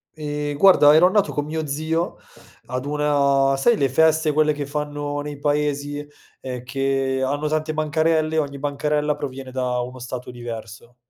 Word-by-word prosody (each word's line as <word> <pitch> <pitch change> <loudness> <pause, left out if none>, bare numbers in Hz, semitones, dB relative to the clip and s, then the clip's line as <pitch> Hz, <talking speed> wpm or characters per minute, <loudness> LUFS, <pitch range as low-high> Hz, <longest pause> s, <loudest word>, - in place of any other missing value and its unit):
Ehm, 150 -1 -4
guarda 150 -5 +7
ero 160 +3 +6
andato 205 +1 +2
con 145 0 -2
mio 155 +1 -3
zio 155 +4 -2 0.5
ad 125 +2 -4
una 140 -2 +2
sai 210 +12 +3
le 135 - +2
feste, 160 +2 +3
quelle 155 0 +3
che 145 -1 -4
fanno 145 0 -3
nei 145 -1 -7
paesi? 145 0 -1 0.4
Ehm, 125 -2 -6
che 135 0 -1
hanno 145 +3 -1
tante 155 0 -1
bancarelle, 155 +1 +1
ogni 140 -2 -2
bancarella 150 +1 -1
proviene 135 -2 -6
da 125 -1 -1
uno 125 +1 -5
stato 125 0 -6
diverso. 120 -1 -8
145 Hz, 155 wpm, -22 LUFS, 135-155 Hz, 0.5 s, guarda